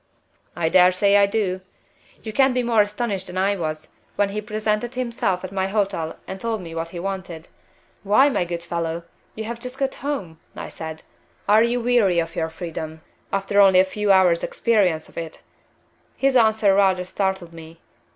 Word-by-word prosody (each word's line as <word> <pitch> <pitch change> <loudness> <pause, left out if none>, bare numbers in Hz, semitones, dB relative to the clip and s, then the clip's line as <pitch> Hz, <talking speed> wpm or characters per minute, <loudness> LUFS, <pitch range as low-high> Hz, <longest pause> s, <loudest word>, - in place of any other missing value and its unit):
"I 165 -2 0
dare 180 +1 +6
say 200 +2 +3
I 200 0 +5
do! 200 -3 -1 0.6
You 220 - -6
can't 265 0 +3
be 250 - +1
more 230 -2 +3
astonished 205 -2 -2
than 180 - -6
I 195 +2 +2
was, 155 -4 -4 0.3
when 205 -1 +1
he 210 +1 -3
presented 215 +3 -2
himself 235 -7 -1
at 185 - -6
my 190 -1 -1
hotel 195 -5 -2
and 190 0 -7
told 225 -3 -2
me 165 -1 -8
what 165 0 -4
he 175 - -7
wanted. 180 -3 -5 0.5
'Why, 210 +8 +4
my 265 -10 +1
good 170 -1 -5
fellow, 170 -1 -3 0.3
you 220 - -5
have 230 +1 -5
just 250 +2 -8
got 270 0 -1
home,' 195 - -5 0.2
I - - -7
said. 160 -1 -8 0.4
'Are 210 +2 +6
you 235 +1 +1
weary 230 -7 +3
of 165 -1 -1
your 160 0 -1
freedom, 160 -1 -7 0.3
after 195 +1 +2
only 190 -2 +6
a 185 - +5
few 205 +1 0
hours' 180 -3 +4
experience 190 -9 +1
of - - -8
it?' 165 -1 -8 0.7
His 270 -1 +2
answer 220 -4 +4
rather 190 -2 +3
startled 190 -2 -3
me. 165 0 -12
195 Hz, 185 wpm, -22 LUFS, 170-220 Hz, 0.7 s, dare